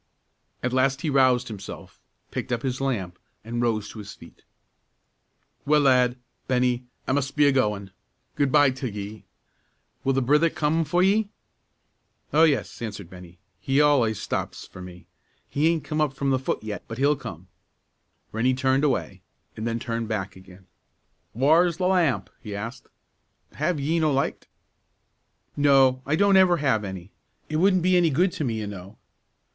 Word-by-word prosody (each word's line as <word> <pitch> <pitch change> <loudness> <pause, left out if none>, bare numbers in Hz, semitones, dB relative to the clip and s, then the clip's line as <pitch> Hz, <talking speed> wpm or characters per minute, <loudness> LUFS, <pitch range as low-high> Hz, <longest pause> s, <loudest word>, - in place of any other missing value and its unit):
At 125 0 -1
last 135 +2 +2
he 155 - -1
roused 130 -2 +3
himself, 100 -4 -9 0.3
picked - - -4
up 120 -2 -1
his 130 0 -2
lamp, 100 -10 -2 0.2
and 120 +2 -3
rose 110 -3 0
to 110 - -10
his 100 -1 -8
feet. - - -16 1.2
"Well, 150 +1 +3
lad, 125 -2 +3 0.3
Bennie, 125 -1 +1 0.2
I - - 0
mus' 140 0 0
be 145 +1 +2
a 140 - +5
goin'; 105 -7 0 0.4
good 140 -2 0
by 145 -2 +5
till 130 -1 -4
ye. 105 +1 -8 0.8
Will 135 - +1
the 135 - +1
brither 150 +6 +4
come 160 +2 0
for 175 +5 +2
ye?" 205 +2 +2 1.0
"Oh, 160 +2 +6
yes!" 145 -6 -1
answered 105 -6 -6
Bennie, 90 -1 -12 0.3
"Tom 135 - -1
al'ays 135 -8 +3
stops - - -4
for 90 - -12
me; 90 -1 -11 0.4
he 150 +3 +1
aint 165 -2 +1
come 155 0 -2
up 150 -3 +1
from 140 0 -1
the 130 - +2
foot 130 - -3
yet, 105 -1 -5
but 115 - -7
he'll 145 +3 +3
come." 115 - -9 0.8
Rennie 125 +4 +1
turned 130 +2 +1
away, 120 -9 -1 0.3
then 115 +1 -3
turned 115 -1 -3
back 95 -3 -3
again. 95 0 -16 0.7
"Whaur's 160 +7 +3
the 185 - -1
lamp?" 180 -7 +1
he 105 -3 -7
asked; 115 +5 -7 0.7
"have 155 +2 -1
ye 160 +4 0
no 155 -2 +2
licht?" 135 0 -1 1.1
"No; 135 -3 +4
I 150 - +2
don't 200 +2 +4
ever 180 -2 +5
have 130 -8 +1
any. 95 -1 -7 0.4
It 155 - -1
wouldn't 185 +1 +3
be 185 0 +3
any 175 -2 +4
good 175 +6 +2
to 155 - -4
me, 115 -4 -2
you - - -4
know." 100 0 -9
130 Hz, 170 wpm, -25 LUFS, 110-150 Hz, 1.2 s, Oh